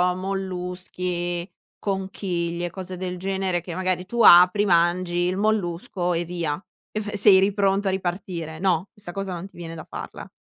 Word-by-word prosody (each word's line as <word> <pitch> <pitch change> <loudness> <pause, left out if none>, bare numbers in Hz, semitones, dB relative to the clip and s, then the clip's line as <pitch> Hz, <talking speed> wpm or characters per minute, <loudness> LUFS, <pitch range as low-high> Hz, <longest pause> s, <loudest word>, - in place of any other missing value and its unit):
molluschi, 180 -2 -3 0.3
conchiglie, 180 -3 -2
cose 185 0 -7
del 180 0 -4
genere 190 -1 -1
che 175 0 -7
magari 185 0 -1
tu 235 +5 -1
apri, 180 +2 +8
mangi 175 0 +2
il 180 +2 +1
mollusco 180 -4 0
e 170 +1 -1
via. 170 -2 -3 0.3
Ef 210 0 -4
sei 200 -2 +7
lì 195 +1 +2
pronto 195 0 +2
a - - +3
ripartire, 175 -3 -4
no, 185 -1 +1
questa 185 -4 -8
cosa 195 -1 -3
non 175 +2 -6
ti - - -24
viene 165 -1 -7
da 160 - -8
farla? - - -8
180 Hz, 160 wpm, -24 LUFS, 175-195 Hz, 0.3 s, apri